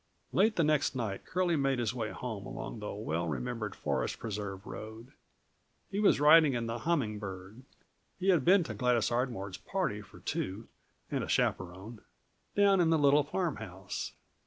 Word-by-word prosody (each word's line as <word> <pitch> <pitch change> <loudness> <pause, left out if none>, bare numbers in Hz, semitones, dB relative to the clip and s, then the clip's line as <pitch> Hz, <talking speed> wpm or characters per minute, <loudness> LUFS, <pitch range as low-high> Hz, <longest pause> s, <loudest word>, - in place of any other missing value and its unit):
Late 215 +3 +4
the 170 - +3
next 150 -2 +2
night 110 -6 -3
Curlie 180 -1 +1
made 135 -2 +1
his 120 0 0
way 115 -4 -2
home 110 -4 -5
along 130 -3 -6
the 105 - -5
well 85 -5 -2
remembered 110 - -3
Forest 70 -4 -1
Preserve 100 -2 -5
road. 115 +1 -8 0.8
He 200 - -1
was 205 -8 +4
riding 150 -2 +7
in 120 -1 -1
the 115 +1 -3
Humming 120 -8 0
Bird. 95 +3 -8 0.6
He 190 +1 0
had 175 -7 +4
been 185 +3 +6
to 165 - -5
Gladys 125 -3 +1
Ardmore's 115 -6 -2
party 105 - -2
for 105 - -15
two 100 +5 -3 0.4
and - - 0
a - - -4
chaperon 95 +5 -1 0.5
down 200 -2 +5
in 165 - +3
the 165 - +4
little 145 0 +5
farmhouse. 125 - -4
120 Hz, 165 wpm, -31 LUFS, 105-155 Hz, 0.8 s, riding